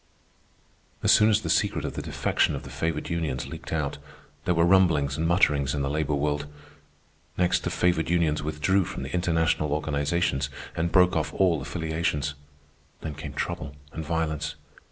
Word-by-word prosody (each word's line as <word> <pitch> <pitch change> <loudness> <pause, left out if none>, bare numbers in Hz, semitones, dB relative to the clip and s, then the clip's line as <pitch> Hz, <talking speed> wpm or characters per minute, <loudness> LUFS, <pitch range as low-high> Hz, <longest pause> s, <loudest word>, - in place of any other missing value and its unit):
As - - +5
soon 110 +1 +6
as 110 0 +3
the 80 - -4
secret 80 - +1
of - - -3
the - - -4
defection - - 0
of - - -6
the - - -10
favored 80 -1 -2
unions 80 -6 -2
leaked - - -8
out, 75 -3 -2 0.5
there 90 - +2
were 85 0 +4
rumblings 85 -7 +4
and 80 +2 0
mutterings 75 -6 +3
in 70 - -1
the 70 - -1
labor 75 -1 0
world. 75 0 -1 0.9
Next, 90 -1 +2
the - - -1
favored 85 -3 +1
unions 85 -3 +2
withdrew 75 +6 +1
from - - -6
the - - -6
international 80 -4 +1
organizations 75 -1 0 0.3
and 85 +1 -1
broke 90 0 +5
off 80 -1 -1
all 90 -6 +3
affiliations. 80 -1 -2 0.7
Then 80 - -4
came 75 -1 -7
trouble 70 0 -4 0.2
and 80 - -4
violence. 80 -2 -2
80 Hz, 170 wpm, -26 LUFS, 75-85 Hz, 0.9 s, soon